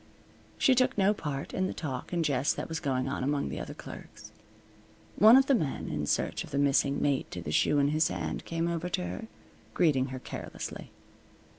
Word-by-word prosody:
She 265 - +4
took 255 -2 +2
no 200 +1 +4
part 145 -7 -5
in 185 0 0
the - - -5
talk 135 -5 -5
and 170 -2 0
jest 140 0 +1
that - - -4
was 160 0 -3
going 130 -2 -1
on 135 -1 -2
among 140 +1 0
the - - -5
other - - -6
clerks. - - -11 0.8
One 220 +4 +8
of 270 - +5
the 275 - +3
men, 155 - -1
in 75 0 -3
search - - 0
of - - -11
the 140 - -3
missing 140 0 +2
mate 140 -2 0
to 90 - -6
the 80 -3 -5
shoe 145 - +3
in 140 0 +3
his 155 +2 +2
hand, - - -4
came 165 0 -2
over 170 +1 -2
to 90 - -2
her, 90 +5 -6 0.5
greeting 145 -7 +3
her 130 -1 -6
carelessly. - - -7
145 Hz, 205 wpm, -29 LUFS, 135-170 Hz, 0.8 s, One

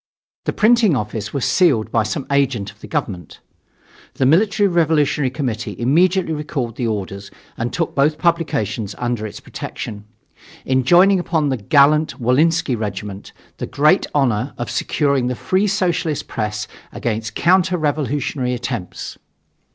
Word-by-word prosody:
The - - -1
printing 220 -6 +4
office 105 -2 -3
was 140 -3 -1
sealed 145 -13 +2
by 115 - +2
some 110 +6 -3
agent 135 -8 +1
of - - -25
the - - -9
government. 90 -1 -4 0.8
The 130 - +1
Military 200 +8 +3
Revolutionary 150 -5 +2
Committee 125 -5 -3
immediately 170 +7 +2
recalled 145 -6 -3
the 120 -2 -2
orders 100 -2 -4 0.3
and 120 +1 -3
took 165 - -2
both 150 +2 +2
publications 135 - -1
under 120 -3 -2
its 105 - -9
protection, 105 -1 -7 0.6
enjoining 175 +10 +4
upon 160 -4 0
the 130 - 0
"gallant 145 +8 +3
Wolinsky 140 +4 +2
Regiment 100 -2 -5 0.3
the - - -4
great 155 +6 +3
honor 130 -2 +1
of 120 - -4
securing 140 -4 0
the 125 - -1
free 190 +10 0
Socialist 175 -6 -1
press 105 -1 -3 0.2
against 110 -1 -3
counter 185 +1 +3
revolutionary 145 -4 -1
attempts." 120 -6 -5
140 Hz, 135 wpm, -19 LUFS, 115-165 Hz, 0.8 s, printing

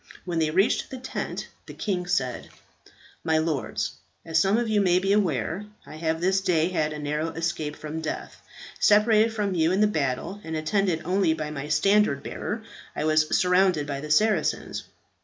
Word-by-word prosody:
When 175 -2 -1
they 155 -1 +2
reached 190 +7 +2
the 260 - -6
tent, 255 - -5 0.2
the - - -9
king 185 -4 -2
said, 130 -8 -1 0.7
"My 160 -1 +2
lords, 155 -5 -1 0.3
as 160 0 +2
some 195 +5 +3
of 240 -1 0
you 215 -1 +2
may 180 -2 +4
be 195 +2 +2
aware, 180 - 0 0.2
I 155 - -10
have 160 0 -1
this 190 +2 +2
day 170 -2 +2
had 155 -4 0
a 150 - -5
narrow 150 +2 -2
escape 160 -2 -3
from 155 +1 -6
death. 155 - -5 0.4
Separated 215 +1 +5
from 210 -3 -1
you 165 -1 +2
in 190 - +1
the 210 - +5
battle, 165 +2 -2
and 160 0 -5
attended 165 +1 0
only 180 -2 +2
by 155 -1 -4
my 145 -1 -5
standard 155 -1 +3
bearer, 220 +1 -4 0.3
I - - -2
was 155 0 +3
surrounded 180 -4 +3
by 140 -1 -4
the 150 - -7
Saracens. 200 +1 +1
165 Hz, 180 wpm, -26 LUFS, 155-195 Hz, 0.7 s, Separated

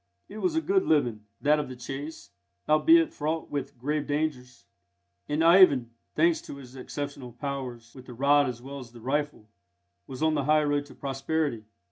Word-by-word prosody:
It 210 - -9
was 350 +3 0
a 320 - +2
good 385 +2 +2
living, 120 -9 +1 0.2
that 150 +1 +4
of 145 - -4
the 130 - -7
chase, 140 +5 -7 0.4
albeit 325 - +5
fraught 155 +2 -3
with 140 -2 -4
grave 145 +4 -2
dangers; 145 -4 -3 0.6
and 150 +2 +1
Ivan, 165 -9 +6 0.2
thanks 165 +1 +3
to - - -9
his 130 -2 -12
exceptional 135 -1 -6
powers 125 -3 -6
with 130 -1 -13
the 125 - -9
rod 140 +2 +4
as 120 -1 -7
well 140 +1 -7
as 120 -3 -11
the 120 - -12
rifle, 140 -2 -2 0.6
was 130 +3 -5
on 160 0 +3
the 145 -3 0
high 155 +1 +4
road 145 -1 0
to - - -14
prosperity. 140 -3 -2
145 Hz, 180 wpm, -27 LUFS, 125-155 Hz, 0.6 s, Ivan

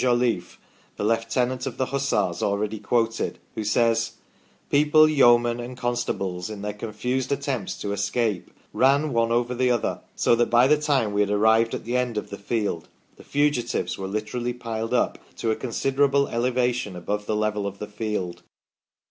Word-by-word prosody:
Jolliffe, 120 -7 +1 0.4
the - - -3
Lieutenant 120 +4 0
of 130 -1 -5
the 130 - +1
Hussars 140 -10 0
already 105 +2 -1
quoted, 115 +2 0 0.2
who 110 - -4
says: 115 +2 +2 0.3
" - - -35
People, 150 +2 +6
yeomen, 120 -5 +4
and 125 +1 -7
constables, 115 -7 -2
in 105 -2 -7
their 105 0 -3
confused 120 +5 -3
attempts 140 -7 -2
to 100 - -2
escape, 105 -2 -1 0.2
ran 140 +2 +3
one 115 0 +2
over 120 +1 +1
the 125 +1 +1
other, 120 -2 0
so - - +3
that 120 - +2
by 120 +2 +5
the 150 +2 +3
time 135 -8 +1
we 100 - +2
had 100 - +1
arrived 110 +2 +3
at - - -7
the 120 +2 -2
end 125 -3 -1
of 105 - -4
the 100 - -6
field, 100 -5 -2 0.3
the - - -14
fugitives 145 -4 0
were 95 - -3
literally 110 +4 -3
piled 115 -1 -3
up - - +1 0.2
to 115 - -1
a - - +1
considerable 135 +3 +1
elevation 125 -3 0
above 105 +4 -3
the 110 - 0
level 105 -1 0
of 100 0 -6
the 105 - -5
field 105 -4 -4
115 Hz, 175 wpm, -24 LUFS, 105-125 Hz, 0.4 s, People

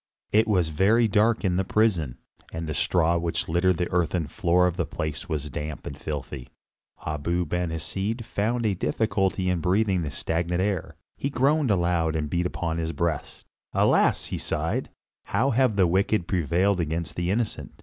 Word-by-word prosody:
It 110 +2 +4
was 90 -6 +2
very 105 +9 +3
dark 110 +2 +2
in 90 -1 +1
the 95 - +2
prison, 90 - +1 0.3
and 80 0 -4
the 75 - -2
straw 85 +1 +2
which 85 0 -2
littered 85 +2 +2
the 90 - -2
earthen 90 -1 +1
floor 85 +5 +2
of 90 -2 0
the - - -1
place 75 +1 -4
was 75 -2 -3
damp 75 +2 -5
and 70 - -5
filthy. 70 -3 -6 0.6
Abu 85 +4 -1
Ben 90 +2 -1
Hesed 100 - -3
found 115 +3 -1
a 105 - +2
difficulty 95 -1 0
in 90 -1 +1
breathing 95 +2 +2
the 75 - -3
stagnant 85 +4 -1
air, 95 -2 -1 0.2
he 140 - -2
groaned 140 +1 +2
aloud 85 -4 +1
and 75 -2 -2
beat 90 +1 +1
upon 85 -2 -3
his 80 0 -2
breast. 80 0 -3 0.3
"Alas!" - - +3
he - - -2
sighed, - - -2 0.4
"how 135 +3 +1
have 125 -2 +2
the 95 -2 +4
wicked 95 +1 +1
prevailed 90 +3 +1
against 80 0 -2
the 85 0 -1
innocent. 100 - -2
90 Hz, 175 wpm, -26 LUFS, 80-100 Hz, 0.6 s, It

